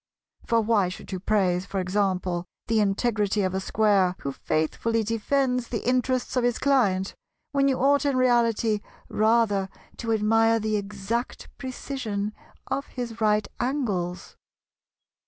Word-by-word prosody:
For 230 -1 +3
why 210 -4 +2
should 185 - -9
you 185 - -3
praise, 185 -2 +1
for 195 - -2
example, 185 -2 -1 0.2
the 225 -1 +1
integrity 210 0 +1
of 185 -1 0
a 190 - 0
Square 195 -2 +2
who 140 - -3
faithfully 220 +11 -1
defends 250 +3 0
the 230 -1 -4
interests 255 0 +1
of 250 - +2
his 245 -1 +1
client, 205 -9 +2 0.4
when 275 -1 +2
you 265 -2 +2
ought 280 +2 +3
in 280 -2 +1
reality 235 -3 +2 0.3
rather 215 -3 +2 0.3
to 230 -1 -3
admire 225 +1 +3
the 215 0 -1
exact 210 +3 -4
precision 245 -6 -4 0.3
of 275 +2 -3
his 235 -3 -6
right 210 -1 +2
angles? 210 -10 -2
220 Hz, 135 wpm, -26 LUFS, 195-245 Hz, 0.4 s, For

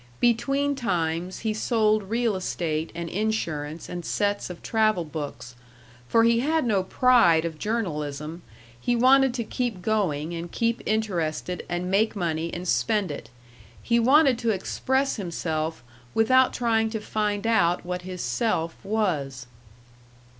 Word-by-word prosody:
Between 275 +5 +2
times 180 -7 -2
he 220 -1 0
sold 215 -2 +1
real 230 -2 +1
estate 165 -4 -2
and 170 0 -4
insurance 165 -7 -2
and 175 -1 -6
sets 205 +3 -1
of 180 - -9
travel 215 -6 +1
books, 145 -5 -6 0.5
for 230 - +4
he 230 0 +4
had 310 +3 +1
no 205 -5 +2
pride 185 -6 +4
of 160 -2 -5
journalism; 155 - -3 0.4
he 240 - +1
wanted 265 +2 +5
to 235 - -1
keep 225 -5 -3
going 175 -8 0
and 170 0 -6
keep 230 0 0
interested 180 -5 -1
and 175 +1 -2
make 220 +3 +2
money 165 -3 -2
and 180 +1 -5
spend 210 -2 +1
it; 115 -6 -8 0.5
he 235 0 +1
wanted 265 +1 +5
to 235 -2 0
express 265 +7 0
himself 160 - -3 0.3
without 255 +4 +4
trying 225 -2 +1
to 220 0 -3
find 210 -1 -2
out 180 -7 +2
what 180 0 -3
his 180 0 -6
self 165 - 0
was. 160 - -1
200 Hz, 140 wpm, -25 LUFS, 170-230 Hz, 0.5 s, wanted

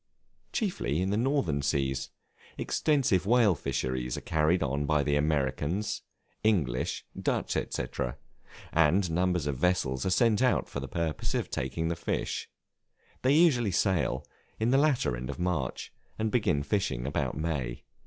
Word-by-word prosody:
Chiefly 175 - -1
in 95 +2 0
the - - +1
Northern 120 - +1
Seas: 65 -2 0 0.5
extensive 130 - +1
whale 115 -4 +5
fisheries 65 -4 -2
are - - -5
carried 80 +3 +2
on 70 +2 -1
by 75 -2 +3
the 70 0 +1
Americans, 75 +6 0 0.4
English, 80 - +1 0.2
Dutch, - - -1
&c., - - -1 0.9
and 85 +3 +3
numbers 90 -2 +1
of 70 -3 -1
vessels 70 -7 +1
are - - 0
sent 115 +3 +3
out 125 -1 +2
for - - -5
the 70 - -5
purpose 80 -1 -2
of - - -2
taking 80 0 -2
the 85 - -1
fish: 85 - -3 0.7
they 135 +3 +4
usually 145 -10 +4
sail 90 -6 +1 0.3
in 110 +2 +2
the 135 - +5
latter 140 - +2
end 60 +2 -6
of 70 - -4
March, 90 -2 -2 0.2
and 110 0 -1
begin 90 -12 +2
fishing 70 -6 -1
about 70 - -1
May. 70 -7 -3
85 Hz, 150 wpm, -29 LUFS, 70-105 Hz, 0.9 s, whale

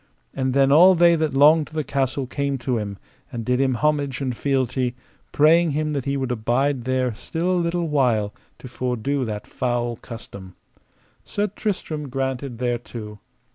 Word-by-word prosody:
And 130 -1 -1
then 135 0 +4
all 180 +6 +7
they 170 0 +5
that 155 -4 -1
longed 150 +2 +5
to 155 - -14
the 155 - 0
castle 135 -1 -1
came 140 +1 -2
to 125 -1 -1
him, 100 -2 -5 0.3
and 115 -3 -5
did 125 +2 +1
him 130 -2 +2
homage 145 -1 0
and 130 -3 -2
fealty, 130 -2 0 0.4
praying 160 +1 +4
him 155 +1 -1
that 140 -3 -2
he 140 0 -1
would 130 -2 -2
abide 125 +3 0
there 130 -2 0
still 165 +10 -3
a 180 -1 +2
little 170 0 -1
while 120 -8 +1 0.2
to - - -10
fordo 125 +2 -2
that 105 -1 -5
foul 120 -2 -2
custom. 100 -6 -10 0.7
Sir 205 - -1
Tristram 180 -8 -4
granted 130 -1 -3
thereto. 120 -3 -4
135 Hz, 170 wpm, -23 LUFS, 120-150 Hz, 0.7 s, all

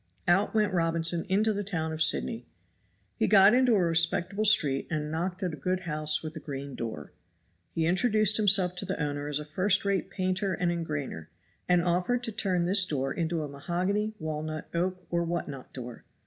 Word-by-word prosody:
Out 195 +5 +2
went 210 -2 +2
Robinson 165 0 +1
into 215 +3 +2
the 205 0 -3
town 160 -5 -3
of 160 - -5
Sydney. 120 -6 0 0.7
He - - +1
got 200 0 +7
into 250 -2 +4
a 190 - +3
respectable 170 +5 +1
street, 145 -10 +3
and 150 -2 -3
knocked 180 +4 -3
at 180 -3 -1
a - - -6
good 185 +6 -1
house 155 -3 0
with 155 0 -6
a - - -5
green 140 -2 -6
door. 110 -13 -6 0.6
He 165 - +1
introduced 215 +4 +3
himself 195 -4 +3
to 195 - -3
the 190 -2 -3
owner 145 -1 -2
as 150 -1 -1
a 150 - -5
first 185 +6 +1
rate 195 -1 0
painter 185 0 -1
and 175 0 0
engrainer, 150 - -4 0.4
and 180 -1 +4
offered 180 +8 0
to 230 - -2
turn 185 -4 0
this 195 +2 +4
door 135 -6 -2
into 165 -1 -2
a - - -4
mahogany, 185 +9 -2
walnut, 155 0 -4
oak 180 +1 -2
or 170 0 +1
what 170 +1 -2
not 135 -3 -9
door. 125 -2 -8
175 Hz, 190 wpm, -28 LUFS, 155-195 Hz, 0.7 s, got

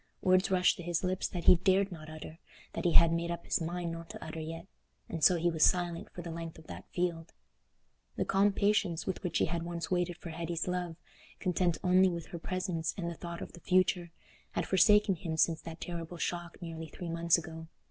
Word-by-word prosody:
Words 185 0 +4
rushed 180 -1 +3
to - - -6
his 175 0 -1
lips 185 +1 0
that 175 -2 -5
he 180 - +8
dared 190 +2 +2
not 155 -3 -9
utter—that 155 +3 -9
he 170 - +3
had 170 -1 +7
made 170 0 -1
up 170 0 -4
his - - 0
mind 170 +1 -2
not 165 0 -7
to - - -8
utter 160 +1 -6
yet—and 165 0 -8
so 180 - +7
he 170 +1 +1
was 160 -1 +2
silent 175 -2 +2
for 175 - -8
the 170 - -6
length 165 0 -6
of 160 - -14
that - - -10
field. 170 -2 -2 0.8
The - - -1
calm 200 +1 +3
patience 200 -4 +1
with 190 - -3
which 180 -5 -1
he - - +3
had 170 +1 -2
once 170 +1 -4
waited 175 -1 0
for 170 - -8
Hetty's 170 +1 -3
love, 180 -2 -2 0.4
content 180 -3 +1
only 185 +1 +5
with 170 -2 -4
her 170 - -6
presence 180 -2 -2
and 170 -3 -2
the - - -4
thought 170 0 -7
of - - -10
the - - -11
future, 180 0 +2 0.4
had - - -1
forsaken 200 +1 +5
him 160 -2 -4
since 160 0 +3
that 165 0 -8
terrible 170 0 -5
shock 175 0 -3
nearly 165 -1 -6
three 175 +2 -7
months 170 0 +3
ago. 160 -1 -7
170 Hz, 215 wpm, -32 LUFS, 165-180 Hz, 0.8 s, he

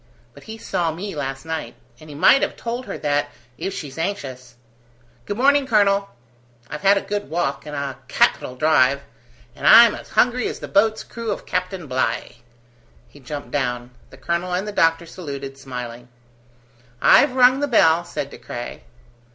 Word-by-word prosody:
But - - -16
he 220 0 -8
saw 175 -6 -2
me 190 +5 -6
last 135 0 -5
night, 160 0 -5 0.2
and 155 -1 -14
he 145 - -9
might 260 - +5
have - - -1
told 240 +2 -5
her - - -5
that, 145 -1 0 0.3
if 195 - -3
she's 145 -3 -7
anxious. 130 - -5 0.7
Good 205 - -3
morning, 280 +2 +3
colonel. 200 -4 +2 0.6
I've 150 - -5
had 200 +1 +5
a - - 0
good 205 +1 -4
walk, 155 -3 -2
and 150 - -6
a 140 -2 -4
capital 125 - +1
drive, 140 -1 +3 0.5
and - - -2
I'm 235 -2 +9
as - - -10
hungry 250 -1 +2
as - - -5
the - - -8
boat's 220 +2 +2
crew 230 -1 -7
of 205 - -4
Captain 185 -1 -3
Bligh." 130 -2 -2 0.7
He 145 - -17
jumped 145 +2 -7
down. 125 -3 -2 0.2
The - - -15
colonel 170 +1 -2
and 190 +3 -2
the - - -3
doctor 165 -3 +2
saluted, 140 -6 -7
smiling. 125 -2 -7 0.9
"I've 285 - +5
rung 255 +1 +5
the 290 - 0
bell," 170 - +4
said 140 -5 -5
De - - -11
Craye. 120 - -7
165 Hz, 175 wpm, -21 LUFS, 140-205 Hz, 0.9 s, I'm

